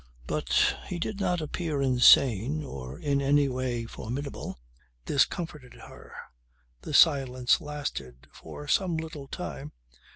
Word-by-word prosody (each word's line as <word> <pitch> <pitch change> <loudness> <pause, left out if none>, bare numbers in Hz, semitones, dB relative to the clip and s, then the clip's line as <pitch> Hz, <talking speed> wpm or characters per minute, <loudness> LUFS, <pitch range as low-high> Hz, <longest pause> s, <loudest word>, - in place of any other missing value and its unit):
But - - +1
he 180 - -4
did 200 +4 -4
not 180 -3 0
appear 155 -1 -3
insane 130 +1 +4
or 65 - -8
in 140 -1 0
any 140 +1 +3
other 135 - -2
way 125 -2 -2
formidable. 130 +5 -6 0.5
This 140 - +4
comforted 150 -8 -7
her. - - -14 0.7
The - - -4
silence 130 -3 +4
lasted 70 - -6
for 145 - -10
some 175 +1 +1
little 160 -3 -6
time. 80 - -7
140 Hz, 130 wpm, -28 LUFS, 125-155 Hz, 0.7 s, insane